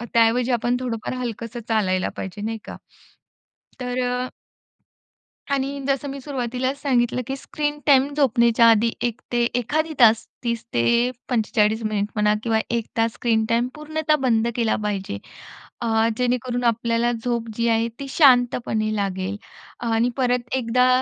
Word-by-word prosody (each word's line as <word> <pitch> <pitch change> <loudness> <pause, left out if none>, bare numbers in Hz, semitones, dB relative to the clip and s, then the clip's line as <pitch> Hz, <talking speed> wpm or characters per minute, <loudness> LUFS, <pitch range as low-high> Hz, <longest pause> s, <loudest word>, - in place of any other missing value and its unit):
अ, - - -5
त्याऐवजी 235 +2 +3
आपण 240 +1 +1
थोडंफार 235 -2 -3
हलकसं 235 -1 -5
चालायला 190 -5 +1
पाहिजे 190 +2 -6
नाही 225 +1 -3
का? - - -8 1.0
तर 250 0 -2
अ 250 +1 -2 1.2
आणि 280 0 -1
जसं 275 +1 0
मी 275 +1 -6
सुरुवातीलाच 260 0 -3
सांगितलं, 250 -3 +1
की 270 - -2
स्क्रीन 295 +1 -3
टाईम 275 -2 +5
झोपण्याच्या 235 -5 +4
आधी 225 +1 +3
1 240 0 -2
ते 240 -1 +2
एखादी 310 +7 0
तास 225 -2 +6 0.2
30 235 -2 -2
ते 235 - +3 0.2
45 220 -2 +1
मिनिट 210 -1 -1
म्हणा 210 -1 +3
किंवा 225 -2 +2
1 235 -2 -1
तास 225 0 +2
स्क्रीन 225 -2 +1
टाईम 235 +1 +2
पूर्णतः 305 0 0
बंद 230 -2 +2
केला 230 -2 +1
पाहिजे. 195 - -3 0.6
अ, 225 -1 +2
जेणेकरून 250 0 -1
आपल्याला 235 0 +1
झोप 235 -2 -1
जी 235 +1 0
आहे 225 0 +2
ती 275 - -5
शांतपणे 245 -6 +3
लागेल. 195 0 -2 0.5
आणि 225 +2 +2
परत 250 -1 0
एकदा 250 0 +2
235 Hz, 145 wpm, -23 LUFS, 225-255 Hz, 1.2 s, तास